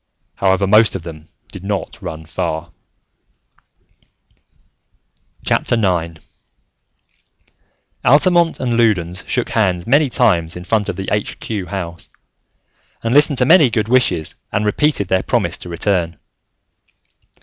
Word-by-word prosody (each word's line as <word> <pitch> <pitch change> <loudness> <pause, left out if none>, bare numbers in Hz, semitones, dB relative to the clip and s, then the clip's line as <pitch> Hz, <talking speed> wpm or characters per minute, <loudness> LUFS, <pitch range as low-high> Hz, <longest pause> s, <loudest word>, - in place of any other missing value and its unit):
However, 95 0 +1
most 105 +2 +4
of 95 - -5
them 80 -1 -10 0.2
did 95 - -10
not 100 -2 -4
run 80 0 -7
far. 80 +2 -4 2.8
IX - - 0 2.3
Altamont 170 +5 +3
and 120 -2 -1
Loudons 90 -5 +1
shook 125 - -1
hands 95 -6 0
many 140 +4 +3
times 90 -10 +1
in 90 - -7
front 105 +3 0
of - - -3
the 95 - -6
Aitch 105 -1 -2
Cue 100 -5 -4
House, 85 -3 -6 0.9
and 115 +1 0
listened 145 -1 +4
to 125 - +3
many 160 -2 +6
good 110 -2 -1
wishes, 95 -11 +1 0.2
and 105 - -1
repeated 105 -1 +1
their 95 0 +1
promise - - -1
to - - -8
return. 85 -1 -1
100 Hz, 120 wpm, -18 LUFS, 85-120 Hz, 2.8 s, many